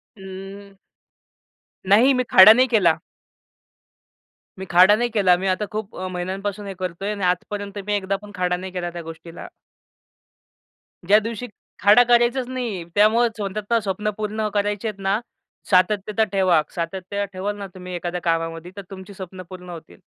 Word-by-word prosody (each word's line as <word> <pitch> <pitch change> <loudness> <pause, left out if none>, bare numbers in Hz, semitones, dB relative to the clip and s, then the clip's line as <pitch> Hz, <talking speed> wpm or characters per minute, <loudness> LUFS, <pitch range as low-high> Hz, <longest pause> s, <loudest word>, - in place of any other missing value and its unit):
अं. 195 0 -10 1.1
नाही, 235 +7 +6
मी 255 -1 +1
खाडा 200 +3 +10
नाही 255 +3 +3
केला. 190 -9 +3 1.6
मी 190 - -5
खाडा 185 +4 +6
नाही 240 +2 -1
केला 190 -5 +4
मी 190 +2 -3
आता 190 +3 0
खूप 215 0 -5
अ, 185 - -4
महिन्यांपासून 190 +3 -4
हे 195 - -5
करतो 185 +1 -4
आहे 210 - -1
आणि 200 -2 -6
आजपर्यंत 200 +3 -2
मी 210 - 0
एकदा 195 -1 -1
पण 210 0 -12
खाडा 180 -1 0
नाही 185 +1 -7
केला 175 -1 -3
त्या 175 - -6
गोष्टीला. 165 +1 -10 1.6
ज्या 200 +4 +6
दिवशी 230 +2 -5 0.4
खाडा 210 +5 +7
करायचाच 240 +1 +2
नाही. 240 -8 -4
त्यामुळंच 225 +2 +3
स्वत:चं 210 +3 -1
स्वप्न 210 0 -2
पूर्ण 215 0 -2
करायचे 205 +1 -1
आहेत 210 -2 -6
ना, 195 +2 +1 0.5
सातत्य 205 +3 +2
ठेवा. 185 -5 +3
सातत्य 185 +4 -3
ठेवाल 195 +3 -3
ना 200 -1 -6
तुम्ही 180 -1 -9
एखाद्या 175 0 -4
कामामध्ये 165 +1 -2
तर - - -5
तुमची 190 +1 -10
स्वप्नं 185 -1 -9
पूर्ण 180 -1 -10
होतील. 160 - -11
195 Hz, 160 wpm, -22 LUFS, 180-210 Hz, 1.6 s, खाडा